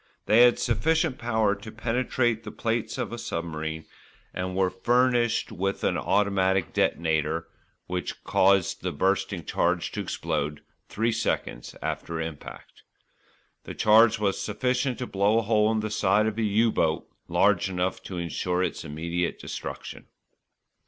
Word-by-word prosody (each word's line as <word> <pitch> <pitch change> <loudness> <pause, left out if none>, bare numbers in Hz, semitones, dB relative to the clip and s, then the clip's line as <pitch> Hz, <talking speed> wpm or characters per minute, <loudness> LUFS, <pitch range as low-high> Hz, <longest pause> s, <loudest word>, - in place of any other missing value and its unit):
They 110 +3 +5
had 120 -1 +6
sufficient 160 - +1
power 110 -3 +1
to 105 +2 -9
penetrate 120 +1 0
the 105 - -6
plates 115 -1 -2
of - - -3
a 120 - -5
submarine, 80 -7 -4 0.5
and 90 0 -3
were 95 -1 +2
furnished 120 +4 +2
with 95 +2 -2
an - - +1
automatic 95 -3 +1
detonator, 80 0 0 0.4
which 90 0 -4
caused 95 -1 +3
the - - -2
bursting - - 0
charge - - 0
to - - -3
explode 75 +1 -3 0.3
three 115 +2 0
seconds 110 - -2
after 85 -1 -3
impact. 80 -2 -8 0.8
The - - -7
charge 110 +2 +5
was 100 -2 0
sufficient 125 +4 -1
to 125 - -3
blow 100 +1 +2
a 115 - +2
hole 110 0 +3
in 110 -1 0
the 110 0 -4
side 105 0 +2
of 110 0 -2
a - - +1
"U" 110 +2 +3
boat 80 -5 0 0.2
large 100 -1 +2
enough 90 0 -2
to 95 - -6
ensure 90 +1 -1
its 90 - -3
immediate 85 +4 -3
destruction. - - -7
100 Hz, 145 wpm, -26 LUFS, 90-115 Hz, 0.8 s, had